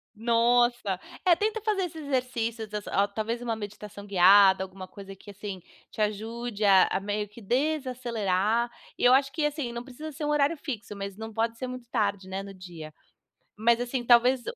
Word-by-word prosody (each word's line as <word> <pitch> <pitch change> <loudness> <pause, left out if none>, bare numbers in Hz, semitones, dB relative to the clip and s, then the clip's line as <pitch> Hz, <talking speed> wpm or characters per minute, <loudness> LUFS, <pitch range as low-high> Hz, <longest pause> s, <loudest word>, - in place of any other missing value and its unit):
Nossa. 235 -2 +2 0.3
É, 350 -2 +6
tenta 430 +4 -1
fazer 415 -2 0
esses 320 -3 -8
exercícios, 235 -5 -2
desa 210 -1 -5
a 200 +1 +3
talvez 220 +3 -3
uma 235 -2 -2
meditação 205 -1 -8
guiada, 190 0 +6
alguma 190 0 -9
coisa 195 0 -11
que, 205 +2 -13
assim, 200 -2 -7 0.3
te - - -6
ajude 220 +1 -3
a 195 -2 +7
a 190 - +1
meio 205 +1 -3
que 210 +3 -14
desacelerar. 240 -5 0 0.3
E - - -5
eu 245 - +7
acho 275 +1 +3
que, 310 +1 -2
assim, 295 -4 -2
não 235 0 -5
precisa 280 +5 -8
ser 300 +1 -5
um - - -1
horário 295 +2 +2
fixo, 235 -8 -6
mas 200 0 -6
não 220 0 -7
pode 230 +1 -1
ser 255 - -4
muito 250 -2 -8
tarde, 200 -4 -1
né, 190 +1 -4
no 195 0 -9
dia. 170 -5 -10 0.6
Mas, 235 +2 +3
assim, 245 +1 -2
talvez 245 +2 +5
230 Hz, 190 wpm, -27 LUFS, 200-250 Hz, 0.6 s, a